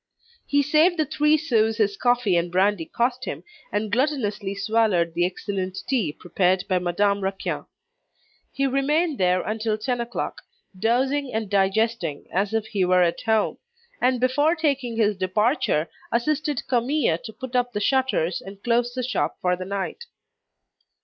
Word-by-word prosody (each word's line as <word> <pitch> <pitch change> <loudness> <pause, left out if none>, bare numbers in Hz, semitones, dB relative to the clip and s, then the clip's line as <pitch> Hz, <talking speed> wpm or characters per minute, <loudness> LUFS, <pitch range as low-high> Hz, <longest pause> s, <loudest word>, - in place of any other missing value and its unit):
He 285 0 +3
saved 315 +5 +3
the 310 - +2
three 300 +1 +3
sous 225 -8 +1
his 205 -3 +1
coffee 245 -4 +2
and 170 0 0
brandy 190 -1 +2
cost 245 +5 -1
him, - - -5 0.3
and 210 0 -2
gluttonously 220 -6 -1
swallowed 200 -5 +1
the 175 +1 +2
excellent 190 0 -4
tea 230 - +1
prepared 180 +3 0
by 185 -1 +2
Madame 200 +3 +1
Raquin. 195 0 -3 0.9
He 275 - -1
remained 285 +4 +1
there 180 0 +2
until 215 +1 -1
ten 245 +2 -2
o'clock, 235 0 -4 0.3
dozing 260 +7 +1
and 220 -2 -3
digesting 195 -5 +1
as 195 +3 +1
if 225 -1 0
he 205 -3 -1
were 180 0 +4
at 170 -1 0
home; 220 -1 +1 0.4
and 255 0 +2
before 290 +6 +2
taking 275 -7 -1
his 210 -2 +2
departure, 190 - +1 0.2
assisted 295 +3 0
Camille 245 - +1
to 220 - -7
put 255 +2 -8
up 245 0 +1
the 205 - -2
shutters 255 -7 +1
and 195 +1 -11
close 240 +1 +1
the 255 - -2
shop 165 - -1
for 180 0 +1
the 185 +1 -6
night. 200 - -4
220 Hz, 155 wpm, -24 LUFS, 190-255 Hz, 0.9 s, were